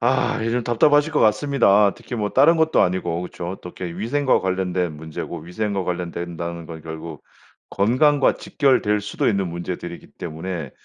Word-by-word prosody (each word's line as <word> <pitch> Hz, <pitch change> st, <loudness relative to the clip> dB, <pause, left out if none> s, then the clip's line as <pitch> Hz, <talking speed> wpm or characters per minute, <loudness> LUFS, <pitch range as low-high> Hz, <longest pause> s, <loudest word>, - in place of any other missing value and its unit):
아 120 Hz, -2 st, +1 dB
이 115 Hz, -, -1 dB
좀 125 Hz, 0 st, 0 dB
답답하실 145 Hz, +6 st, +3 dB
것 -, -, +2 dB
같습니다. 105 Hz, -3 st, +4 dB
특히 125 Hz, -, -8 dB
뭐 105 Hz, -3 st, -1 dB
다른 155 Hz, +6 st, +5 dB
것도 160 Hz, 0 st, +3 dB
아니고 90 Hz, -2 st, -1 dB
그렇죠. 90 Hz, -1 st, -6 dB
어떻게 90 Hz, -1 st, -7 dB
이렇게 85 Hz, +1 st, -7 dB
위생과 130 Hz, +5 st, +2 dB
관련된 90 Hz, -3 st, -1 dB
문제고 80 Hz, +1 st, -6 dB
위생과 95 Hz, +3 st, -3 dB
관련된다는 85 Hz, -1 st, -4 dB
건 80 Hz, -1 st, -9 dB
결국 80 Hz, -1 st, -8 dB, 0.5 s
건강과 130 Hz, +8 st, +3 dB
직결될 110 Hz, -7 st, +1 dB
수도 105 Hz, -, -2 dB
있는 100 Hz, -4 st, 0 dB
문제들이기 85 Hz, 0 st, -6 dB
때문에 80 Hz, -3 st, -5 dB
95 Hz, 380 characters per minute, -22 LUFS, 85-120 Hz, 0.5 s, 다른